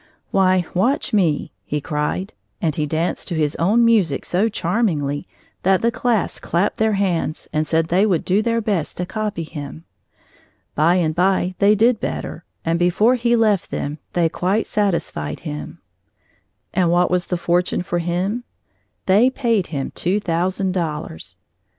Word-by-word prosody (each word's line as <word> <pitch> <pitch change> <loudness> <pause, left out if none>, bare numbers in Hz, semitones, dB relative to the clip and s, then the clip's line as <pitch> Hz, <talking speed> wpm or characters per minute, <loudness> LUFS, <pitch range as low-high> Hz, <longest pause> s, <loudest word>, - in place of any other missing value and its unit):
"Why, 185 -2 +3
watch 250 +8 +1
me," 170 -8 +1
he 150 - -2
cried, 150 +6 -2 0.3
and 155 -4 0
he 150 -1 -1
danced 160 +3 -2
to 175 - -3
his 150 -2 0
own 215 +8 +3
music 200 -12 +2
so 195 +6 +1
charmingly 165 -10 -1 0.3
that 190 +2 +2
the 235 - +3
class 235 -5 0
clapped 180 +5 0
their 220 -1 +2
hands 180 -6 -1
and 155 0 0
said 165 0 +1
they 190 +5 +3
would 180 -6 0
do 195 +3 +2
their 230 +1 0
best 200 -8 -2
to 180 - -2
copy 210 -3 -3
him. 150 0 -8 0.9
By 165 +4 +3
and 165 -4 +1
by 185 +1 +1
they 205 +1 +5
did 225 +2 +3
better, 165 - -4 0.2
and 165 +1 +1
before 180 +7 +3
he 240 -1 +2
left 215 -5 +2
them, 145 +2 -4
they 170 -2 +3
quite 185 +6 0
satisfied 170 - -1
him. 75 0 -7 0.9
And 180 -2 +2
what 175 +1 +3
was 180 0 +1
fortunate 175 0 0
for 175 - -1
him, 180 +7 -1 0.6
they 200 +5 +5
had 260 - +1
paid 230 -8 +1
him 140 -4 -4
two 190 +4 0
thousand 185 +1 -1
dollars. 155 - -4
180 Hz, 160 wpm, -21 LUFS, 165-210 Hz, 0.9 s, they